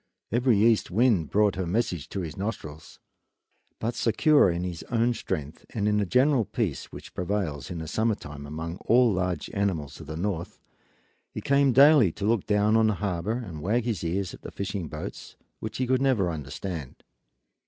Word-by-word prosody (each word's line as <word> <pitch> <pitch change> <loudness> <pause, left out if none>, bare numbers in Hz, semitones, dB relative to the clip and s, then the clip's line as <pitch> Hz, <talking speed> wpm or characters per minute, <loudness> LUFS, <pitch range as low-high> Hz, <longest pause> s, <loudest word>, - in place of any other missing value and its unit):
Every 120 0 +3
east 110 +1 +3
wind 105 - +2
brought 105 -1 +3
her 95 -2 -2
message 90 - -1
to 100 - -3
his 80 -4 -6
nostrils; 95 -7 -6 0.8
but 115 +2 -2
secure 145 - +4
in 85 +1 -2
his 90 -3 -4
own 120 0 +2
strength 80 -9 -5
and 105 -2 0
in 105 0 +2
the 105 -2 +1
general 130 - +3
peace 100 - -2
which - - -11
prevails 90 -7 -2
in 90 - -5
the 80 -1 -5
summer 110 +5 +1
time 75 -4 -9
among 80 +3 -5
all 120 -1 +5
large 90 -3 -2
animals 85 -9 -2
of 80 - -10
the 80 +1 -5
north, 90 -2 -3 0.7
he - - -6
came 140 -1 +3
daily 135 - +7
to 100 - -4
look 110 -2 +1
down 105 +1 +3
on 110 -1 +4
the 110 - +1
harbor 100 +5 -2
and 80 -6 -8
wag 110 +8 +1
his 110 -9 -2
ears 90 +3 -2
at - - -11
the - - -7
fishing 100 -3 -4
boats, - - -8 0.2
which 110 +1 -5
he 130 - 0
could 130 +1 +1
never 115 -10 +2
understand. 75 0 -6
100 Hz, 185 wpm, -27 LUFS, 85-115 Hz, 0.8 s, daily